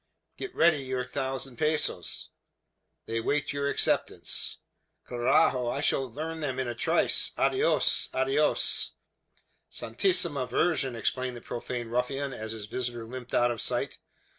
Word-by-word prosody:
"Get 390 -2 -7
ready 160 -3 +4
your 130 -1 -3
thousand 130 0 -4
pesos." 155 0 0 0.8
"They 115 0 -2
wait 145 +5 -1
your 140 0 -1
acceptance." - - 0 0.5
"Carajo! 120 0 +2
I 140 - -2
shall 135 -3 +2
earn 160 +1 -4
them 135 -4 -2
in 130 -1 -1
a 120 - -2
trice. 120 - +3
Adios! 415 +5 +3
Adios!" 410 +2 +2 0.8
"Santissima 165 - +2
Virgen!" 135 -4 +1
exclaimed 125 +2 -2
the - - -10
profane 120 0 -5
ruffian, 135 +3 -1
as 110 -2 -6
his 110 -2 -6
visitor 120 +1 -4
limped 125 +1 -6
out 120 0 +3
of 115 -3 -4
sight. - - -1
130 Hz, 135 wpm, -28 LUFS, 120-145 Hz, 0.8 s, ready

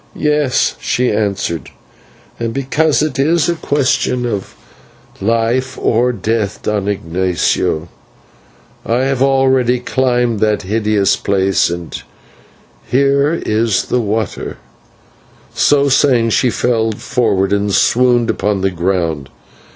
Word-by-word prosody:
"Yes," 150 -3 +1
she 125 0 0
answered, 100 -6 -2 0.7
"and 115 0 -3
because 150 +3 +1
it 150 -4 -3
is 160 +3 +2
a 175 - +1
question 130 -5 0
of 105 -5 -4 0.7
life 115 +5 0
or 120 +2 +1
death, 110 -3 -2
Don 105 -2 -1
Ignatio, 90 -3 -1 1.0
I 120 +3 0
have 135 -1 -1
already 130 -2 +3
climbed 125 -3 0
that 105 0 +1
hideous 105 0 +1
place, 95 -2 +1
and 85 -1 -6 0.9
here 140 +4 +2
is 110 -1 +1
the 125 - 0
water" 110 -2 -3 1.1
and 135 -5 +3
she 125 - +2
fell 115 -2 0
forward 105 -5 0
and 100 0 0
swooned 120 +2 +3
upon 100 -1 -1
the 95 0 +1
ground. 85 -5 -2
115 Hz, 110 wpm, -15 LUFS, 100-130 Hz, 1.1 s, already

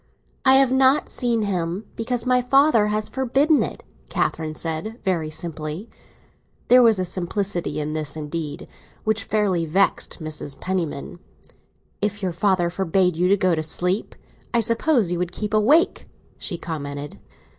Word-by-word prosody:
"I 265 0 +7
have 270 -1 +5
not 265 +2 +4
seen 235 -3 0
him, 185 0 -2
because 230 +1 -2
my 250 0 +3
father 260 -3 +4
has 210 0 -1
forbidden 270 +4 +2
it," - - -4 0.3
Catherine 155 -1 -1
said 165 +9 -3
very 170 -5 0
simply. 155 +4 -6 0.8
There 250 +1 +8
was 225 -3 +5
a 185 - -1
simplicity 180 0 -2
in 150 0 -3
this, 155 -2 -1
indeed, 150 -1 -5 0.4
which 220 0 0
fairly 190 -6 0
vexed 190 +6 +1
Mrs. 155 -3 -6
Penniman. 175 -4 -3 0.8
"If 205 0 -2
your 180 -2 -1
father 175 -1 +1
forbade 180 -1 +1
you 180 +2 +2
to 200 - +4
go 185 -2 +2
to 160 - 0
sleep, 180 +6 -1 0.4
I - - +5
suppose 230 - +2
you 175 - -1
would 180 0 -2
keep 210 +3 -4
awake!" 275 - +3 0.3
she 175 - -3
commented. 145 -3 -6
190 Hz, 150 wpm, -23 LUFS, 165-225 Hz, 0.8 s, There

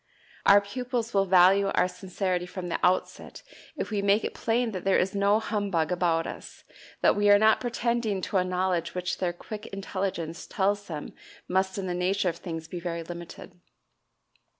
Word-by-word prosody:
Our 200 0 +8
pupils 240 +2 -4
will 195 -1 +2
value 190 +2 +5
our 180 -2 +2
sincerity 185 -1 -3
from 180 -1 -6
the - - -1
outset 185 - 0 0.3
if - - -4
we 205 -2 0
make 200 +2 +3
it - - -3
plain 235 0 0
that 185 -3 -5
there 195 -1 +3
is 190 - 0
no 200 +1 +3
humbug 200 -7 -1
about 170 -2 +1
us, - - -9 0.4
that - - +4
we 205 0 +3
are 205 - +8
not 220 +1 +4
pretending 235 -4 -1
to 195 - -1
a 185 - +3
knowledge 180 -2 -1
which 180 -1 -2
their 180 -2 0
quick 210 +5 -8
intelligence 190 -4 -4
tells 205 +1 0
them 155 -3 -6 0.3
must 190 +1 0
in 195 - -3
the 180 - -2
nature 185 +2 +1
of 170 - -5
things 165 -2 -6
be 175 +2 -6
very 170 -1 -4
limited. 170 +1 -10
190 Hz, 180 wpm, -27 LUFS, 180-205 Hz, 0.4 s, Our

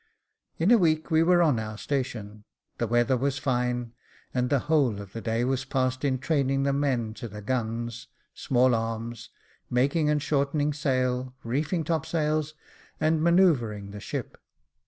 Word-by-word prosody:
In 170 +7 +2
a 240 - +7
week 160 -2 +1
we 160 0 +5
were 175 +1 +5
on 145 -8 +3
our 110 -1 -5
station, 110 -6 -4 0.4
the 120 - 0
weather 120 +3 +2
was 135 +2 0
fine, 125 -2 -1 0.4
and 125 -1 0
the 140 - +3
whole 140 -9 +2
of 100 -1 -10
the 115 - -5
day 115 +1 0
was 130 +1 0
passed 130 0 -1
in 135 -2 +1
training 135 -1 0
the 140 0 +1
men 130 -6 0
to 120 - -7
the 105 -1 -9
guns, 115 0 -3 0.3
small 125 -1 +2
arms, 115 0 -3 0.4
making 140 +5 +2
and 150 0 +2
shortening 145 +1 0
sail, 130 -3 -1
reefing 150 +8 -1
topsails, 155 -1 -1 0.4
and 155 0 +2
manoeu 170 +2 +5
vring 105 -5 -6
the 105 - -8
ship. - - -6
130 Hz, 160 wpm, -27 LUFS, 115-150 Hz, 0.4 s, a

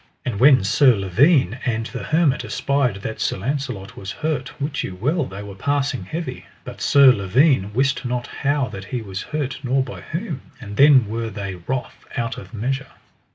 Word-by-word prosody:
And 115 -6 -2
when 130 -4 +6
Sir 130 +4 +5
Lavaine 115 - +3
and 115 -3 -1
the 125 - -6
hermit 155 -3 +2
espied 130 -8 -1
that 110 - -5
Sir - - 0
Launcelot 125 -3 -4
was 95 - -6
hurt, 155 -5 -3
wit 145 +1 -2
you 95 - -5
well 145 - 0
they 100 -1 -8
were 100 -1 -8
passing 135 +1 -1
heavy, 165 - -5 0.2
but - - -9
Sir 140 -2 +7
Lavaine 105 - +2
wist 135 +4 +1
not 125 -1 -2 0.2
how 145 -1 +1
that 95 -1 -8
he 120 +2 -4
was 95 -2 -5
hurt 145 -3 -3
nor 130 0 +1
by 125 - -8
whom. 165 - -5 0.2
And 105 -5 -8
then 135 -3 +6
were 115 +1 -3
they 100 -2 -5
wroth 120 +9 -5
out 115 -1 -2
of 95 - -12
measure. 130 +5 -3
125 Hz, 185 wpm, -22 LUFS, 105-140 Hz, 0.2 s, Sir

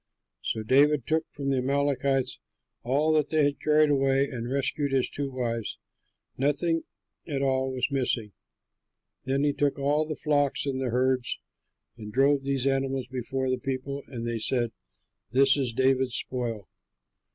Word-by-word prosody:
So 110 - -2
David 140 +3 +4
took 160 0 0
from 140 -1 -3
the 135 - +2
Amalekites 135 0 0 0.4
all 145 +6 +2
that 150 -2 +2
they 155 -1 +3
had 145 0 +1
carried 150 0 +4
away 135 0 +3
and 120 -3 -5
rescued 140 +2 0
his 135 -2 +2
two 140 -1 -3
wives; 115 -4 -3 0.6
nothing 155 +4 +1 0.5
at 140 -4 -1
all 130 -1 +1
was 130 +2 -1
missing. 125 -5 0 0.9
Then 135 +2 +1
he 145 -1 +2
took 145 -1 0
all 145 +2 +1
the 155 - -2
flocks 145 -2 +1
and 135 -2 -2
the 130 - -1
herds 125 +1 +1 0.6
and 105 -2 -8
drove 135 +3 +3
those 135 -1 -1
animals 135 -1 0
before 130 +1 -3
the 130 - 0
people, 135 +2 -3
and 120 -4 -6
they 115 -1 -2
said, 120 0 0 0.6
"This 135 +2 +5
is 135 -4 -1
David's 130 +1 +2
spoil." 115 -5 -3
135 Hz, 155 wpm, -27 LUFS, 130-140 Hz, 0.9 s, This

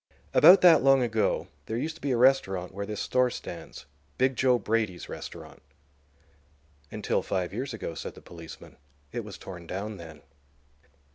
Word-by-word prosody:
About 185 +3 +8
that 175 -2 +7
long 135 -1 +5
ago 110 -2 0 0.2
there 110 - -2
used 155 +6 -2
to 165 - -17
be 145 - -2
a 125 - +1
restaurant 95 -8 +2
where 100 +1 -5
this 105 -1 -5
store 125 0 +2
stands—'Big 75 - -5
Joe' 125 -1 +3
Brady's 110 -4 -2
restaurant." - - -9 1.3
"Until - - -1
five 90 -2 -2
years 130 +5 -4
ago," 110 -7 -5
said - - -7
the - - -12
policeman. 85 -2 -12 0.3
"It 120 - -4
was 105 -2 -9
torn 90 -3 -10
down 100 +4 -5
then." 80 -4 -12
110 Hz, 155 wpm, -27 LUFS, 90-130 Hz, 1.3 s, About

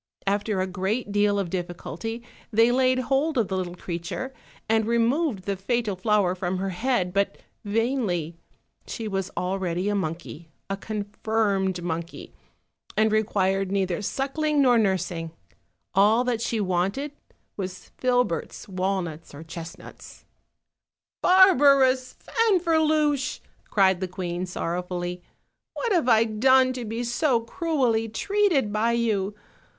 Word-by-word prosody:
After 205 0 0
a 185 - +1
great 195 +5 -2
deal 205 0 +2
of 190 -4 -2
diffi 175 -1 -3
culty 225 +9 -6 0.3
they 225 +2 +4
laid 255 0 +3
hold 270 +4 0
of 225 -5 +1
the 190 - -1
little 180 -2 -3
creature, 180 +9 -5 0.3
and 220 -1 +2
removed 235 - +1
the 200 +1 -2
fatal 215 +1 -1
flower 200 -1 +2
from 185 0 -2
her 195 +1 -2
head; 185 -3 0
but 200 0 0 0.3
vainly: 205 - -1 0.5
she 225 - -5
was 195 -2 -2
already 185 0 -1
a - - 0
monkey, 165 -3 -4 0.2
a - - +1
confirmed 205 -2 -1
monkey, 170 0 -5 0.6
and 215 0 +3
required 195 -3 +1
neither 190 -3 0
suck 270 +8 -3
ling 305 -1 +2
nor 250 -4 +5
nursing; 180 -5 -1 0.6
all 215 +5 +4
that 245 -3 -1
she 230 -1 -1
wanted 195 +9 -1 0.4
was 185 -2 -6
filberts, 245 -10 0
walnuts, 185 -5 -3
or 150 - -9
chestnuts. 165 0 -10 1.0
"Barbarous 275 -8 +5
Fanferluche," 315 - +2 0.3
cried 190 -4 +3
the 185 - -2
queen 180 0 -4
sorrow 175 0 -2
fully, 180 0 -4 0.5
"what 475 - -2
have 335 -9 +2
I 225 -1 +6
done 255 +4 +4
to 250 -2 -5
be 225 +2 -3
so 240 0 +1
cruelly 235 -4 0
treated 340 - +1
by 225 +2 +2
you? 210 -4 0
210 Hz, 135 wpm, -25 LUFS, 185-250 Hz, 1.0 s, I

